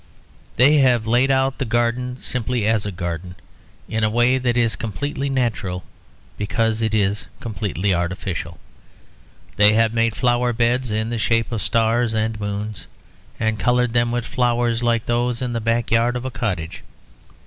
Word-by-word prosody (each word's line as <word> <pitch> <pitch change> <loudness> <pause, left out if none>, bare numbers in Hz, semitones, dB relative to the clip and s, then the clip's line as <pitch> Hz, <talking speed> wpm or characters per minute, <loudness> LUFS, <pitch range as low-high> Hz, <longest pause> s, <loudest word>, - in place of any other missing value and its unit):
They 145 +5 +5
have 125 -4 +3
laid 120 +4 +3
out 135 0 +1
the - - 0
garden 120 +1 -1
simply 125 -2 -2
as 110 -2 +1
a - - -3
garden, 90 0 -5 0.5
in 110 0 -2
a 110 - +3
way 120 +3 +3
that 125 -2 0
is 115 -2 +2
completely 140 +5 -3
natural 110 -9 -1 0.6
because 115 +2 0
it 110 -1 0
is 100 -1 0
completely 100 -3 -2
artificial. 85 -1 -3 1.0
They 105 +1 +6
have 115 0 +3
made 115 -1 +1
flower 120 0 +1
beds 120 +1 +1
in 110 +2 -1
the 120 - -2
shape 115 +2 +1
of 115 -3 -2
stars 115 0 +1
and 110 0 -1
moons, 105 +1 -5 0.5
and 110 -1 0
coloured 125 -1 +2
them 120 0 +2
with 120 0 -2
flowers 120 -2 0
like 120 -2 +1
those 120 0 0
in 125 -2 -3
the 115 - -2
backyard 115 +1 +1
of 125 +1 -4
a 130 - -3
cottage. 95 -8 -3
115 Hz, 160 wpm, -21 LUFS, 105-120 Hz, 1.0 s, They